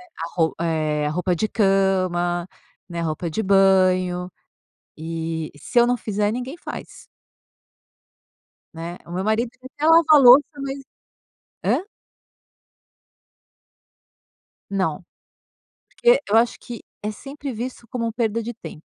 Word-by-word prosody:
né, 365 Hz, -, -17 dB
a 165 Hz, +1 st, -5 dB
roup 165 Hz, -2 st, +1 dB
eh, 155 Hz, -3 st, 0 dB
a 150 Hz, -, -1 dB
roupa 180 Hz, +2 st, 0 dB
de 215 Hz, -, 0 dB
cama, 185 Hz, -4 st, +1 dB, 0.4 s
né, 170 Hz, -1 st, -4 dB
roupa 165 Hz, +1 st, -2 dB
de 220 Hz, +7 st, -2 dB
banho 185 Hz, -2 st, +3 dB, 0.7 s
e 160 Hz, 0 st, -4 dB
se 240 Hz, -, +1 dB
eu 240 Hz, -, +5 dB
não 245 Hz, -, +1 dB
fizer 210 Hz, -2 st, -1 dB
ninguém 250 Hz, +5 st, -5 dB
faz -, -, -9 dB, 1.7 s
né, 170 Hz, +2 st, -6 dB
o 170 Hz, -, -10 dB
meu 185 Hz, -, -2 dB
marido 225 Hz, +2 st, +1 dB
até 290 Hz, +4 st, -4 dB
lava 330 Hz, +1 st, +7 dB
a 300 Hz, -, +9 dB
louça, 260 Hz, +2 st, +9 dB, 0.2 s
mas 275 Hz, 0 st, -4 dB, 0.8 s
hã? -, -, +2 dB, 2.9 s
Não. 185 Hz, -3 st, -1 dB, 1.0 s
Porque 485 Hz, +1 st, +6 dB
eu 220 Hz, -, +4 dB
acho 235 Hz, +1 st, +3 dB
que 240 Hz, -3 st, -9 dB, 0.2 s
é 210 Hz, -, -2 dB
sempre 275 Hz, +5 st, -7 dB
visto 240 Hz, +1 st, -6 dB
como 230 Hz, -2 st, -3 dB
perda 230 Hz, -1 st, -1 dB
de 240 Hz, -, -5 dB
tempo. 160 Hz, -7 st, -10 dB
195 Hz, 130 wpm, -22 LUFS, 170-240 Hz, 2.9 s, a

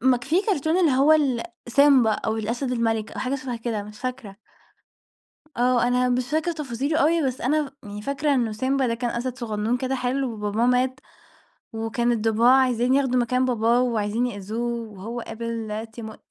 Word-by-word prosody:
ما 255 Hz, +1 st, +4 dB
ك 245 Hz, -, -9 dB
فيه 335 Hz, +7 st, +2 dB
كرتون 325 Hz, -4 st, +1 dB
اللي 335 Hz, -4 st, +4 dB
هو 275 Hz, +4 st, +4 dB
ال 275 Hz, -6 st, +2 dB, 0.2 s
سيمبا 265 Hz, -2 st, +5 dB
أو 220 Hz, +1 st, -2 dB
الأسد 235 Hz, +4 st, -2 dB
المَلِك 225 Hz, -2 st, -1 dB
أو -, -, -6 dB
حاجة 260 Hz, +1 st, -1 dB
شبه 260 Hz, -3 st, -4 dB
كده، 225 Hz, -2 st, -3 dB
مش 210 Hz, +1 st, -12 dB
فاكرة. 250 Hz, -6 st, -5 dB, 1.2 s
آه. 245 Hz, 0 st, +3 dB
أنا 250 Hz, 0 st, +2 dB
مش 250 Hz, 0 st, -1 dB
فاكرة 315 Hz, +3 st, 0 dB
تفاصيله 285 Hz, 0 st, -2 dB
أوي، 325 Hz, +3 st, +3 dB
بس 255 Hz, -1 st, -3 dB
أنا 290 Hz, +1 st, 0 dB
يعني 205 Hz, 0 st, -7 dB
فاكرة 280 Hz, +3 st, 0 dB
إنه 235 Hz, -4 st, 0 dB
سيمبا 260 Hz, +4 st, 0 dB
ده 230 Hz, -, 0 dB
كان 240 Hz, 0 st, -2 dB
أسد 245 Hz, +1 st, -3 dB
صغنون 220 Hz, 0 st, -1 dB
كده 260 Hz, +1 st, -2 dB
حلو 255 Hz, 0 st, -1 dB
وباباه 210 Hz, +2 st, -1 dB
مات، 255 Hz, +1 st, +1 dB, 0.7 s
وكان 225 Hz, +2 st, -1 dB
الضباع 225 Hz, +2 st, +3 dB
عايزين 250 Hz, 0 st, +2 dB
ياخدوا 265 Hz, -2 st, +2 dB
مكان 250 Hz, +2 st, +1 dB
باباه 240 Hz, -1 st, +2 dB
وعايزين 230 Hz, -1 st, 0 dB
يأذوه 230 Hz, +2 st, -4 dB
وهو 220 Hz, +5 st, -6 dB
قابل 225 Hz, -1 st, -5 dB
تيمو 220 Hz, -1 st, -8 dB
245 Hz, 175 wpm, -24 LUFS, 225-265 Hz, 1.2 s, سيمبا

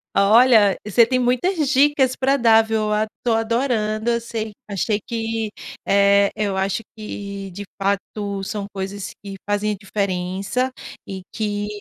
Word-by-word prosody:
Olha, 215 Hz, 0 st, +6 dB
você 215 Hz, +3 st, +5 dB
tem 255 Hz, +2 st, 0 dB
muitas 270 Hz, +6 st, +1 dB
dicas 275 Hz, -2 st, +3 dB
pra 270 Hz, +1 st, +2 dB
dar, 225 Hz, -3 st, +6 dB
viu? 220 Hz, -1 st, -1 dB
Ad 210 Hz, +1 st, +1 dB, 0.2 s
tô 240 Hz, -, +2 dB
adorando. 225 Hz, -1 st, 0 dB
Eu 235 Hz, 0 st, 0 dB
sei 225 Hz, -2 st, -5 dB, 0.2 s
achei 205 Hz, +1 st, 0 dB
que 225 Hz, -1 st, -2 dB, 0.4 s
eh, 200 Hz, 0 st, +4 dB
eu 205 Hz, -2 st, -1 dB
acho 195 Hz, +2 st, 0 dB
que 200 Hz, -2 st, -7 dB
de 200 Hz, +3 st, -7 dB, 0.2 s
fato 200 Hz, 0 st, -2 dB
são 205 Hz, 0 st, -4 dB
coisas 195 Hz, 0 st, -5 dB
que 200 Hz, -1 st, -7 dB
fazem 205 Hz, +1 st, +1 dB
a -, -, -4 dB
diferença 195 Hz, +4 st, -2 dB, 0.3 s
e 190 Hz, -1 st, -6 dB
que, 205 Hz, -1 st, -2 dB
215 Hz, 145 wpm, -21 LUFS, 200-235 Hz, 0.4 s, Olha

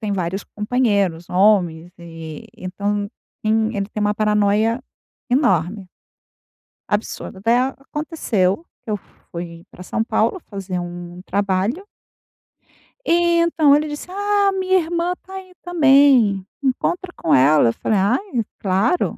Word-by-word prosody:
tem 210 Hz, -2 st, -2 dB
vários 190 Hz, 0 st, -2 dB
companheiros 205 Hz, -7 st, 0 dB
homens. 180 Hz, -4 st, +2 dB
E, 165 Hz, -2 st, -9 dB
então, 200 Hz, +2 st, -3 dB, 0.3 s
tem 220 Hz, 0 st, +1 dB
ele 200 Hz, -1 st, -1 dB
tem 215 Hz, -, -4 dB
uma 210 Hz, 0 st, +1 dB
paranoia 210 Hz, +2 st, +2 dB, 0.5 s
enorme 195 Hz, -, +1 dB, 1.0 s
absurda 205 Hz, -2 st, -3 dB
daí 245 Hz, +3 st, +3 dB, 0.2 s
aconteceu. 295 Hz, -, -1 dB, 0.2 s
Eu 215 Hz, -3 st, -2 dB, 0.3 s
fui 170 Hz, -1 st, -7 dB
pra 180 Hz, -, -11 dB
São 220 Hz, +4 st, -1 dB
Paulo 225 Hz, -, 0 dB
fazer 195 Hz, -3 st, -4 dB
um 175 Hz, 0 st, -7 dB
trabalho 200 Hz, -, -1 dB, 1.2 s
e 340 Hz, 0 st, +3 dB
então 320 Hz, -4 st, +4 dB
ele 300 Hz, +1 st, +1 dB
disse: 295 Hz, +2 st, -6 dB
"Ah, 405 Hz, 0 st, +2 dB
minha 375 Hz, 0 st, +2 dB
irmã 340 Hz, +1 st, -1 dB
tá 380 Hz, -, -13 dB
aí 375 Hz, -1 st, -9 dB
também. 275 Hz, -, +4 dB, 0.2 s
Encontra 345 Hz, +7 st, -1 dB
com 160 Hz, -, 0 dB
ela", 140 Hz, -1 st, +5 dB
eu -, -, -1 dB
falei: 215 Hz, -, 0 dB
"Ai, 240 Hz, -, 0 dB, 0.2 s
claro". 200 Hz, -, +1 dB
210 Hz, 125 wpm, -20 LUFS, 185-295 Hz, 1.2 s, ela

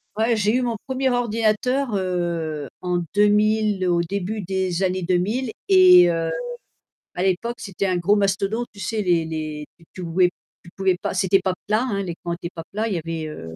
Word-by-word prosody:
Ouais, 225 Hz, +2 st, +2 dB
j'ai 210 Hz, +1 st, +2 dB
eu -, -, 0 dB
mon 240 Hz, -2 st, -1 dB
1er 265 Hz, 0 st, 0 dB
ordinateur 240 Hz, +1 st, 0 dB
heu, 170 Hz, -5 st, -2 dB
en 180 Hz, -1 st, 0 dB, 0.2 s
2000 210 Hz, -1 st, +3 dB
au 170 Hz, -1 st, +2 dB
début 200 Hz, +4 st, -3 dB
des 190 Hz, -1 st, -1 dB
années 185 Hz, 0 st, 0 dB
2000 190 Hz, +8 st, 0 dB, 0.2 s
et 180 Hz, -2 st, +8 dB
heu, 165 Hz, -1 st, 0 dB, 0.8 s
à 175 Hz, -, -4 dB
l'époque 195 Hz, +6 st, 0 dB
c'était 200 Hz, -2 st, -3 dB
un 185 Hz, -2 st, +1 dB
gros 175 Hz, +4 st, +3 dB
mastodonte, 200 Hz, +3 st, 0 dB
tu 205 Hz, -, -14 dB
sais 210 Hz, +3 st, -2 dB
les 175 Hz, -3 st, +2 dB
les, 155 Hz, -2 st, -5 dB
tu 165 Hz, -, -21 dB
tu 185 Hz, -, -7 dB
pouvais 175 Hz, +1 st, +2 dB, 0.3 s
tu 170 Hz, -, -14 dB
pouvais 190 Hz, -2 st, +1 dB
pas -, -, -3 dB
c'était 195 Hz, 0 st, +3 dB
pas 185 Hz, -1 st, +1 dB
plat, 215 Hz, +3 st, +2 dB
hein, 205 Hz, -6 st, -1 dB
les 175 Hz, -4 st, -4 dB
coins 170 Hz, -1 st, -2 dB
étaient 170 Hz, 0 st, -6 dB
pas 165 Hz, -, -6 dB
plats, 215 Hz, +3 st, -1 dB
il 210 Hz, -, -2 dB
y -, -, 0 dB
avait 165 Hz, -1 st, -4 dB
heu 80 Hz, -, -8 dB
190 Hz, 200 wpm, -22 LUFS, 175-215 Hz, 0.8 s, et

